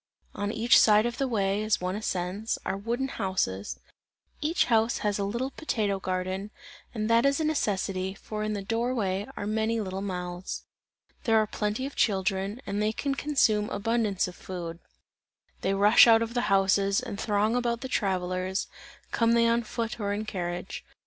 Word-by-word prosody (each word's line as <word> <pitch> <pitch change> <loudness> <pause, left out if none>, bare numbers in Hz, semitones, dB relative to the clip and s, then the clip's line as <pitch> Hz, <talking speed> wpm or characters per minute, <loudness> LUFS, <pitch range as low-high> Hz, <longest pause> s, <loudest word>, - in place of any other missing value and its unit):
On 205 0 -2
each 225 +2 +5
side 215 0 +5
of 240 0 -3
the 270 - +1
way, 200 -3 0
as 215 -1 +1
one 180 +1 -2
ascends, 200 +1 -2
are 190 - -1
wooden 235 +6 -2
houses; 185 - -2 0.6
each 315 +4 +2
house 225 0 +2
has 205 -1 +1
a - - 0
little 235 +7 -2
potato 210 -11 -1
garden, 185 +2 -3 0.4
and 215 -3 -2
that 230 +1 +4
is 275 +1 +3
a - - 0
necessity, 195 -10 -1
for 215 +1 -6
in 215 0 -1
the 200 -1 -3
door 230 +5 -1
way 195 -2 -1
are - - -3
many 220 +2 0
little 190 -2 -3
mouths. 180 -2 -4 0.6
There 225 -2 +4
are 215 - +4
plenty 210 +4 -2
of 275 - -6
children, 195 +3 0
and 200 +1 -2
they 215 +1 +1
can 280 +4 -1
consume 245 -8 +2
abundance 210 -2 0
of 180 - -8
food; 170 -3 -6 0.8
they 195 +1 +1
rush 205 +4 +7
out 225 0 +6
of 230 0 -5
the 245 -3 0
houses, 195 0 +3
and 200 - -6
throng 210 +2 +1
about 235 -1 0
the 260 - -4
travellers, 185 -3 -1 0.5
come 230 0 +3
they 230 0 +4
on 235 0 +3
foot 230 +1 -4
or 200 -1 -1
in 210 +1 -3
carriage. 175 -2 -4
210 Hz, 180 wpm, -28 LUFS, 195-230 Hz, 0.8 s, rush